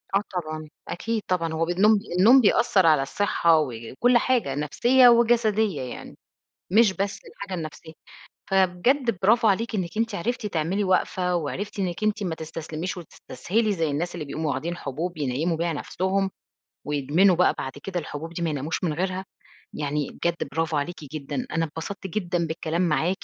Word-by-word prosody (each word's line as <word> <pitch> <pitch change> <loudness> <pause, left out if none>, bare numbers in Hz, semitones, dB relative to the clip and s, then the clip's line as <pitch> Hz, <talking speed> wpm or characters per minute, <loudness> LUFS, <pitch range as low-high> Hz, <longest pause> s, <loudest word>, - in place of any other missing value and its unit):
آه 200 - +4
طبعًا. 155 -3 -4 0.2
أكيد 225 +4 -2
طبعًا. 165 -3 0
هو 165 +1 0
بالنوم 200 +5 +4 0.2
النوم 250 +7 +7
بيأثّر 200 -3 +3
على 155 -4 +5
الصحة، 165 +1 +2
وكل 135 - +1
حاجة 235 - +1
نفسية، 245 - +4
وجسدية 220 - +3
يعني، 125 - -8 0.6
مش 215 -2 +5
بس 195 +1 -2
الحاجة 200 -2 -8
النفسية. 160 +1 -8 0.6
فبجد 195 +5 +2
برافو 225 +2 +4
عليكِ 225 +3 0
إنِّك 185 0 -3
أنتِ 230 -2 0
عرفتِ 225 +4 -2
تعملي 185 +3 -1
وقفة، 185 -1 +1
وعرفتِ 200 +7 -4
إنِّك 185 +1 -2
أنتِ 215 0 0
ما 175 -4 -2
تستسلميش، 160 +3 -5
وتستسهلي 210 +5 -2
زي 165 -5 0
الناس 170 +5 -2
اللي 160 -3 -4
بيقوموا 155 +1 -2
واخدين 170 +6 -3
حبوب 160 +5 -4
ينيّموا 150 +5 -1
بيها 170 0 -1
نفسهم، 190 +5 -1 0.6
و 150 - -4
يدمنوا 155 +7 +3
بقى 180 - +4
بعد 135 - -4
كده 185 -2 -3
الحبوب 160 +2 -7
دي 170 - -5
ما 165 - 0
يناموش 150 +4 -3
من 160 -4 +1
غيرها. 185 +3 -2 0.5
يعني 145 -1 -2
بجد 170 -4 -2
برافو 160 0 -1
عليكِ 160 +5 -2 0.2
جدًا. 155 - -4
أنا 165 0 0
اتبسطت 180 +6 -6
جدًا 175 -3 -1
بالكلام 160 +2 -2
معاكِ، 180 +3 0
175 Hz, 165 wpm, -25 LUFS, 155-205 Hz, 0.6 s, النوم